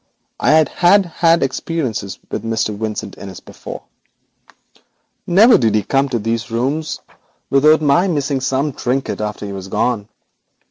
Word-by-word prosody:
I - - +1
had 155 -2 +5 0.4
had 165 -1 +2
experiences 130 - -3
with - - -3
Mr. 115 -2 -1
Vincent 110 0 -5
Innis 95 -2 -9
before. - - -10 1.4
Never 215 +7 +6
did 110 -4 +2
he 105 -2 0
enter 135 -2 +2
these 115 +2 -2
rooms 135 +7 -2
of - - -27
mine - - -34 0.2
without 155 - +3
my 170 +7 +3
missing 145 -5 -1
some 135 +2 0
little - - -18
trinket 130 -2 -1
after 105 -1 -4
he 100 - -6
was 95 -1 -7
gone. 110 0 -1
130 Hz, 150 wpm, -18 LUFS, 110-155 Hz, 1.4 s, Never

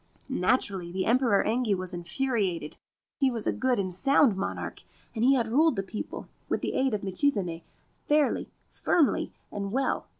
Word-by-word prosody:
Naturally 190 -6 +1
the 185 +1 -2
Emperor 235 -3 +3
Engi 225 -2 +1
was 185 0 -5
infuriated. 180 - -2 0.4
He 270 -2 +4
was 230 -4 -3
a - - +2
good 255 -1 +1
and 185 -2 -2
sound 270 - +4
monarch, 190 - -4 0.3
and 225 - -2
had 255 -3 +4
ruled 290 +5 +3
the 195 - -1
people, 200 +3 -6 0.2
with - - 0
the - - -2
aid 265 -4 +1
of 205 - -5
Michizane, 190 - -1 0.5
fairly, 295 -1 +2 0.2
firmly, 315 -5 +1 0.2
and 200 -1 -4
well. 265 +4 -1
220 Hz, 160 wpm, -28 LUFS, 190-265 Hz, 0.5 s, He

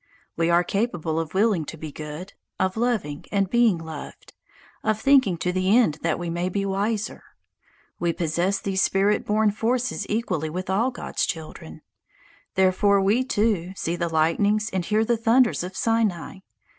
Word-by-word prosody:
We 165 0 +1
are 170 +1 +4
capable 175 -6 -1
of 165 +1 -5
willing 200 -4 +2
to 160 - -8
be 155 -1 -7
good, 155 +6 -8 0.3
of 185 0 0
loving 220 -11 -1
and 195 -2 0
being 235 -6 +4
loved, 160 -2 -9 0.5
of 215 0 0
thinking 260 -8 +4
to 180 +2 -1
the 185 +4 +3
end 160 -11 +2
that - - 0
we 175 - -5
may 175 +2 -2
be 195 +2 -2
wiser. 205 +2 -2 0.8
We 170 -1 +1
possess 175 +4 0
these 190 -1 -1
spirit 200 +2 +2
born 215 0 +3
forces 230 0 -1
equally 185 -8 -1
with 185 +3 -4
all 225 +7 +2
God's 245 - -4
children. 155 - -7 0.7
Therefore 190 +2 +3
we, 205 +6 +2
too, 205 -7 0
see 170 -2 -2
the 170 -1 -2
lightnings 200 +7 +1
and 185 -2 -1
hear 215 +4 +1
the 235 0 +1
thunders 230 -1 +3
of 185 +1 -7
Sinai. 215 -6 0
195 Hz, 165 wpm, -24 LUFS, 170-215 Hz, 0.8 s, are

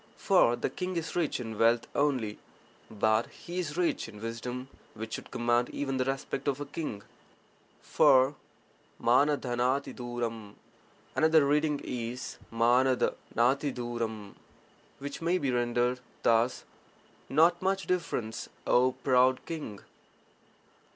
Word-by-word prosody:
For 120 - +4
the - - -2
king 185 0 -4
is 165 -1 -3
rich 170 -4 0
in 110 -3 -6
wealth 115 +1 +4
only, 130 -8 0 0.5
but 110 +1 +1
he 175 +1 -7
is 160 -3 -3
rich 175 -9 0
in 105 -2 -12
wisdom 120 +3 -5 0.3
which 110 +1 -6
should - - -6
command 120 +1 +1
even 135 -2 -2
the 130 - +1
respect 135 +1 -3
of 140 -1 0
a 145 - -4
king. 140 -8 -5 0.8
For 135 -2 +5 0.7
JTH*Hlfd<j<. 120 -4 0 0.6
another 160 -2 +4
reading 150 +1 +2
is 125 0 -5
HW 125 +3 +3 0.2
'Hfd<y, 120 -5 -1 0.6
which 140 +2 -7
may 170 +3 +2
be 140 -7 -1
rendered 120 +1 +1 0.2
thus 115 +2 +2 0.3
— - - -31
'not 165 +5 +4
much 195 +1 0
difference, 145 -11 -2 0.2
O 125 +1 +4
proud 130 0 +3
(king)'. 150 -11 -6
125 Hz, 120 wpm, -30 LUFS, 115-145 Hz, 0.8 s, For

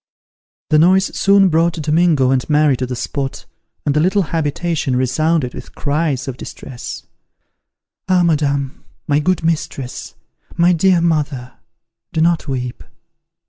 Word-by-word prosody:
The 155 - +5
noise 190 +4 +3
soon 195 -1 +4
brought 165 +1 +2
Domingo 155 -3 +2
and 130 +1 0
Mary 150 -2 +3
to 130 - -3
the 125 - -4
spot, 135 +2 -4 0.4
and 145 - +1
the - - +3
little 190 +5 +2
habitation 160 -3 -1
resounded 130 +2 0
with - - -10
cries 145 -3 -1
of 130 -2 -5
distress, 125 -2 -8 1.1
"Ah, 180 -1 +4
madame! 140 -4 0 0.2
My 145 0 +2
good 180 +2 0
mistress! 150 -5 -3 0.4
My 175 +1 +4
dear 175 +1 +3
mother! 145 -6 -1 0.6
Do - - -1
not 170 0 +1
weep!" 125 -2 -4
150 Hz, 135 wpm, -18 LUFS, 135-170 Hz, 1.1 s, The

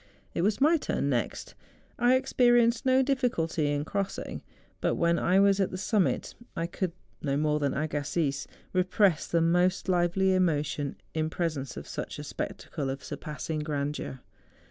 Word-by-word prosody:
It - - -1
was 205 +3 +1
my 315 +4 +5
turn 140 - -1
next; 120 -3 -2 0.5
I 250 +2 +5
ex¬ - - -8
perienced 240 0 +4
no 260 +1 +5
difficulty 235 - 0
in 145 0 -1
crossing, 195 +2 -3 0.4
but - - +1
when 170 0 +2
I 185 +2 +3
was 200 0 +4
at 195 - +2
the 185 - -5
summit 205 0 0 0.2
I 165 - -1
could, 175 0 -3 0.3
no 140 -1 0
more 150 0 +1
than 140 -2 0
Agassiz, 145 -1 -1 0.3
re¬ 185 0 +1
press 185 -5 +3
the 170 - +2
most 180 +3 +2
lively 185 +1 +2
emotion 150 -5 0 0.2
in 155 0 0
presence 155 -6 -3
of - - -7
such - - -5
a - - -6
spectacle 140 -3 -4
of 135 0 -4
surpassing 155 0 -4
grandeur. 145 -3 -3
170 Hz, 165 wpm, -28 LUFS, 150-200 Hz, 0.5 s, my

